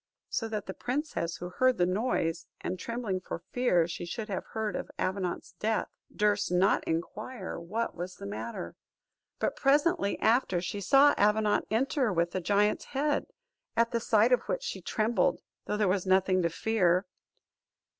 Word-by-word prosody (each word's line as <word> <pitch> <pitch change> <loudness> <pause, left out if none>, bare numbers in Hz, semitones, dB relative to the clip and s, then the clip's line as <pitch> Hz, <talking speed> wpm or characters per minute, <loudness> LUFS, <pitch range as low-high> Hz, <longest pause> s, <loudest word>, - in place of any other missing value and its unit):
so 225 - -1
that 215 -2 -4
the 190 - -5
princess, 250 - -2
who 175 - -6
heard 255 +6 +2
the 175 - +3
noise, 185 -4 -1
and 185 0 -4
trembling 230 -5 -2
for 170 -2 -6
fear 180 -10 +3
she 175 - -5
should 215 +6 -5
have 190 - -2
heard 220 -2 -2
of - - -4
Avenant's 185 -1 -2
death, 220 0 0 0.2
durst 210 -2 +1
not 180 +2 +3
inquire 195 +6 -4
what 215 +8 -3
was 180 +1 -6
the - - -9
matter. 105 -4 -5 0.6
But - - -1
presently 290 - +2
after, 225 -6 +3
she 195 +3 -4
saw 275 +7 +6
Avenant 210 0 +3
enter 255 +1 +1
with 170 -1 +1
the 185 - -2
giant's 205 +3 +2
head; 290 +2 0 0.5
at 230 0 +3
the 235 - +1
sight 225 +1 +3
of 250 - +4
which - - -1
she 475 - -4
trembled, 215 -3 +1 0.3
though 210 - -1
there 210 -2 +2
was 185 0 0
nothing 185 0 +3
to 170 - +1
fear. 180 0 +2
210 Hz, 165 wpm, -29 LUFS, 180-235 Hz, 0.6 s, saw